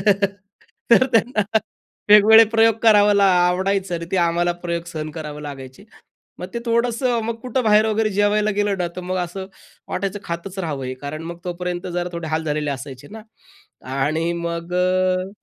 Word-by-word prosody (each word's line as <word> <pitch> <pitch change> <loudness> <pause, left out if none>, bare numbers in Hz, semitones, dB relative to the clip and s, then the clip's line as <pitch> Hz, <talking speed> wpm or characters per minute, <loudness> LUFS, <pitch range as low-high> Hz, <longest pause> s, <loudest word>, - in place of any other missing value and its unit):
टाकायचं 215 - +3 0.8
तर 255 +2 +6
त्यांना 225 -1 +2 0.7
वेगवेगळे 215 +2 +8
प्रयोग 225 -1 +5
करावं 210 -2 +5
ला 200 0 +4 0.2
आवडायचं 190 +1 0
आणि 170 0 -4
ते - - +2
आम्हाला 175 0 +1
प्रयोग 170 -1 -2
सहन 155 -2 -5
करावं 150 -1 -7
लागायचे. 135 +2 -9 0.5
मग 180 - -5
ते - - -1
थोडंसं 235 +1 +1
मग 230 - -2
कुठं 255 0 -1
बाहेर 215 0 +4
वगैरे 220 0 0
जेवायला 210 +1 +2
गेलं 205 -1 +1
ना, 180 - 0
तर - - -4
मग 185 +1 -4
असं 185 +1 -4 0.4
वाटायचं 195 +1 -3
खातच 170 +3 -6
राहावं 150 -7 -3
हे, 130 0 -4
कारण 145 +4 -7
मग 170 - -9
तोपर्यंत 180 0 -4
जरा 175 0 -1
थोडे 170 -1 -5
हाल 160 0 -1
झालेले 150 -1 -1
असायचे 135 0 -7
ना, 220 +1 -10 0.7
आणि 155 +5 0
मग 170 +1 -4
अ, 185 0 +1
180 Hz, 170 wpm, -21 LUFS, 165-210 Hz, 0.8 s, वेगवेगळे